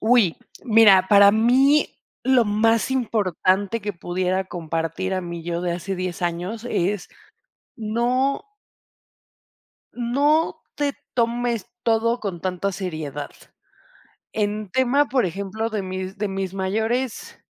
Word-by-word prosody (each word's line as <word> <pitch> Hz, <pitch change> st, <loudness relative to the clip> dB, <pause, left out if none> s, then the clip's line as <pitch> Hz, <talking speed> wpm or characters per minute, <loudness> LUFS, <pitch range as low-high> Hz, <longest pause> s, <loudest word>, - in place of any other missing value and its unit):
¡Uy! 220 Hz, -6 st, +3 dB, 0.3 s
Mira, 215 Hz, -5 st, +6 dB
para 200 Hz, -1 st, +8 dB
mí 260 Hz, +7 st, +4 dB, 0.3 s
lo 260 Hz, -3 st, +4 dB
más 225 Hz, +3 st, +2 dB
importante 205 Hz, -4 st, 0 dB
que 205 Hz, +1 st, -3 dB
pudiera 185 Hz, +1 st, -1 dB
compartir 165 Hz, +2 st, -3 dB
a 185 Hz, -, -1 dB
mi 170 Hz, -1 st, -6 dB
yo 170 Hz, +1 st, -3 dB
de 175 Hz, -1 st, -1 dB
hace 180 Hz, +3 st, -4 dB
10 185 Hz, -1 st, -4 dB
años 180 Hz, +7 st, -3 dB
es 190 Hz, 0 st, -1 dB, 0.7 s
no 245 Hz, +5 st, 0 dB, 1.5 s
no 285 Hz, +7 st, +1 dB
te 285 Hz, -2 st, -1 dB, 0.2 s
tomes 235 Hz, -2 st, 0 dB, 0.2 s
todo 230 Hz, +1 st, +1 dB
con 190 Hz, -5 st, -4 dB
tanta 185 Hz, +2 st, -2 dB
seriedad. 155 Hz, -6 st, -5 dB, 1.0 s
En 210 Hz, -1 st, -2 dB
tema, 260 Hz, +4 st, +3 dB
por 255 Hz, -5 st, +2 dB
ejemplo, 200 Hz, +5 st, -3 dB
de 215 Hz, -2 st, -2 dB
mis 185 Hz, +1 st, -5 dB
de 210 Hz, 0 st, -1 dB
mis 195 Hz, -1 st, -4 dB
mayores 220 Hz, +6 st, -2 dB
205 Hz, 120 wpm, -23 LUFS, 185-235 Hz, 1.5 s, para